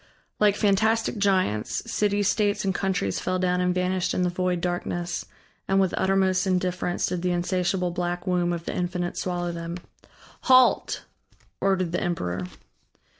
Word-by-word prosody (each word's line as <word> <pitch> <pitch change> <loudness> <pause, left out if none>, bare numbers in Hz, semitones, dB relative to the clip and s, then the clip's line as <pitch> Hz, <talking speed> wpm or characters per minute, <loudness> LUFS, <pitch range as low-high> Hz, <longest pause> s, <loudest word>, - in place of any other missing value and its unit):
Like 210 -1 +4
fantastic 220 +2 +2
giants, 185 - +1
cities, 205 -1 +1
states, 205 -1 +1
and 190 - +1
countries 190 - -1
fell 185 0 -1
down 180 0 +1
and 180 0 +2
vanished 180 0 0
in 180 - +1
the 180 - +1
void 180 0 0
darkness 175 0 -3 0.4
and 195 0 +3
with 190 -2 +2
uttermost 190 0 +2
indifference 180 -1 0
did 180 - -2
the 180 - 0
insatiable 180 +1 0
black 175 0 -3
womb 180 -2 +1
of 170 -1 -4
the - - -3
Infinite 175 0 -2
swallow 175 -1 -2
them. 170 0 -5 0.7
"Halt!" 255 -1 +4 0.6
ordered 190 -3 +1
the 175 - -1
emperor. 90 - -2
180 Hz, 150 wpm, -25 LUFS, 175-195 Hz, 0.7 s, Like